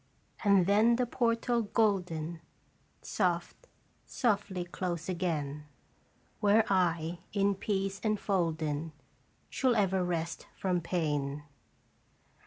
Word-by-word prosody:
* - - -18
And 200 -4 +5
then 215 +5 +4
the 250 +1 +1
portal 235 0 +1
golden 180 -7 0 0.6
Soft, 180 - -1 0.4
softly 200 -6 -1
close 175 -2 -4
again, 155 -5 -2 0.7
Where 210 +2 +4
I, 170 -2 +1
in 200 0 +2
peace 195 0 -2
enf 215 -1 -2
olden, 160 -5 0 0.6
Shall 255 -3 +2
ever 190 -3 +2
rest 170 -2 -3
from 180 -2 0
pain. 150 -4 -1
185 Hz, 100 wpm, -31 LUFS, 165-205 Hz, 0.7 s, And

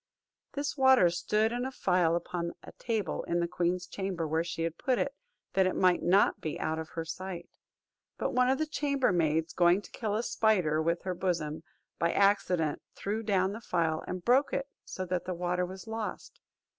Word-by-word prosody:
This 285 0 -2
water 265 - +6
stood 210 +5 +1
in 245 +1 -2
a 265 - -3
phial 180 -8 +2
upon 170 0 -3
a - - -10
table 220 -5 -2
in 170 0 0
the 170 - +1
queen's 180 +1 -1
chamber, 185 -3 -3
where 160 +2 +1
she 165 -1 -4
had 165 0 -3
put 255 -2 +1
it, 275 - -1 0.4
that 190 -1 +4
it 185 - -1
might 180 -1 +3
not 195 +3 +3
be 155 - -4
out 160 0 -1
of 160 - -6
her 165 -1 -5
sight. 175 +1 -6 0.7
But - - -1
one 250 0 +3
of 265 - +3
the 315 - 0
chambermaids 180 - +1
going 175 +1 +4
to - - -13
kill 215 -3 -2
a 225 - 0
spider 205 -9 +2
with 170 +2 0
her 185 - -2
besom, 165 -4 -2 0.4
by 170 - +2
accident 185 -6 +2
threw 210 +3 -2
down 195 -3 +1
the 225 - -7
phial, 160 -6 0
and 180 -1 -5
broke 260 +4 +3
it, 275 - -1 0.2
so 185 - -5
that 180 0 -2
the 185 0 -3
water 180 +1 -1
was 190 +1 -9
lost. 220 -1 -6
185 Hz, 195 wpm, -30 LUFS, 170-220 Hz, 0.7 s, water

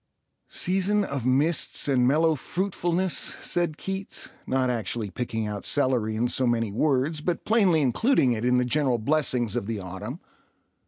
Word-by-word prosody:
"Season 195 +3 +1
of 140 - -3
mists 145 +6 +1
and 125 -3 +3
mellow 160 +4 +3
fruitfulness," 180 +2 -1
said 175 -3 -1
Keats, 195 0 -5 0.2
not 130 -1 +1
actually 115 -3 -3
picking 110 0 -3
out 105 -1 -5
celery 125 -6 +1
in 115 +3 +1
so 130 +1 +1
many 115 -3 0
words, 145 +5 0
but 170 +2 -2
plainly 195 -8 +3
including 140 - +2
it 115 -1 -2
in 125 0 +3
the 125 - +2
general 130 -1 +1
blessings 125 -3 0
of 100 - -2
the 115 -1 -2
autumn. 100 - -7
130 Hz, 155 wpm, -25 LUFS, 120-165 Hz, 0.2 s, and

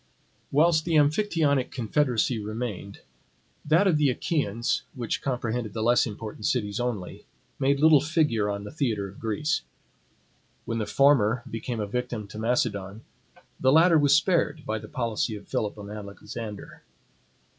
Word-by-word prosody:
Whilst 160 +2 +4
the 165 -1 0
Amphictyonic 150 -3 +2
confederacy 125 -1 0
remained, 105 -2 -5 0.6
that 160 +6 +3
of 180 -6 +3
the 150 -2 +3
Achaeans, 120 -4 -1
which 120 -3 -3
comprehended 120 -4 -2
the 110 - -2
less 120 +1 +4
important 105 0 -5
cities 105 -4 -1
only, 115 -7 -4 0.3
made 140 +1 +2
little 155 -2 +6
figure 150 -10 +1
on 100 0 -3
the 105 - -8
theatre 115 -9 -1
of 100 - -13
Greece. 115 +8 -1 1.0
When 115 -1 -2
the 105 - -2
former 125 -3 +3
became 115 +1 -4
a 105 - -1
victim 120 -1 -4
to 105 - -8
Macedon, 110 -3 -1 0.6
the 130 - +3
latter 165 +2 +6
was 145 -1 +5
spared 160 -2 +1
by 110 0 -2
the 110 - -10
policy 115 -4 -2
of 105 - -11
Philip 105 -1 -2
and 100 0 -9
Alexander. 105 +1 -8
120 Hz, 145 wpm, -26 LUFS, 105-145 Hz, 1.0 s, little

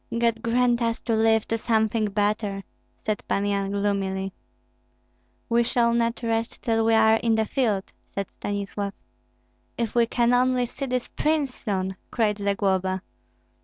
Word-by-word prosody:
God 230 -1 +1
grant 240 +1 +2
us 230 0 0
to 230 - 0
live 220 0 +3
to 225 - 0
something 220 -1 +1
better!" 205 -1 -1 0.4
said 215 -2 -1
Pan 200 - 0
Yan, 200 -1 0
gloomily. 195 -1 -1 1.1
"We 235 0 +3
shall 235 0 +2
not 235 0 0
rest 225 0 -2
till 225 -1 +2
we 225 0 +4
are 220 0 +5
in 225 0 +1
the 220 0 +2
field," 215 -5 0 0.3
said 200 - -1
Stanislav. 200 0 -3 0.8
"If 230 -3 -2
we 235 -1 +3
can 240 +1 +2
only 250 0 +3
see 270 +3 -5
this 250 -1 -1
prince 300 -4 0
soon!" 190 -5 -3
cried 215 -3 0
Zagloba. 190 -2 0
220 Hz, 150 wpm, -25 LUFS, 200-235 Hz, 1.1 s, are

